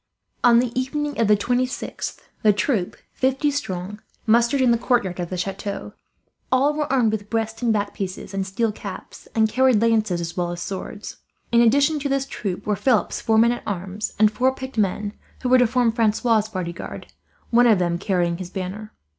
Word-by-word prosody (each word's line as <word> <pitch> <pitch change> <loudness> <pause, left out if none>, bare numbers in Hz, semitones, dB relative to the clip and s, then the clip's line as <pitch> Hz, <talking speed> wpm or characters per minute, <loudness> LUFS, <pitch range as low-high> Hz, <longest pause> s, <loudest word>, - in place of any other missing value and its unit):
On 235 -1 +6
the 240 0 +2
evening 285 +3 -2
of 230 - +3
the 210 0 +5
26th 250 +4 -2 0.2
the 215 - +5
troop, 205 -2 -1 0.2
fifty 265 +3 +1
strong, 205 -6 -4 0.2
mustered 235 +4 +3
in 255 -2 +4
the 235 - +4
courtyard 235 -8 0
of 175 -1 -3
the 185 - -4
chateau. 195 +2 -4 0.6
All 270 +3 +3
were 295 -2 -2
armed 245 -5 +3
with 210 -1 -4
breast 225 0 -2
and 235 -2 +2
back 205 -1 -1
pieces, 190 0 -5
and 195 -1 -2
steel 215 +3 0
caps, - - -9
and 220 -1 +4
carried 255 +1 +3
lances 220 -5 +2
as 170 -1 -5
well 175 -1 -1
as 175 - -5
swords. 195 +3 -6 0.3
In 235 0 +5
addition 285 +6 +4
to 280 0 -2
this 275 0 0
troop 195 -8 -5
were 210 - +1
Philip's 240 +2 +1
four 220 -1 +2
men 235 +2 +5
at 240 - -4
arms; 195 +1 -4
and 215 0 +5
four 260 +4 +1
picked 260 0 -7
men 205 +1 0 0.3
who 250 - 0
were 255 0 +6
to 245 - +5
form 240 0 +2
Francois' 220 -1 +2
bodyguard, 175 -4 -6 0.4
one 240 +1 +5
of 220 -3 +5
them 175 -1 0
carrying 175 -3 0
his 180 -2 -6
banner. 195 +3 -6
220 Hz, 195 wpm, -23 LUFS, 195-250 Hz, 0.6 s, On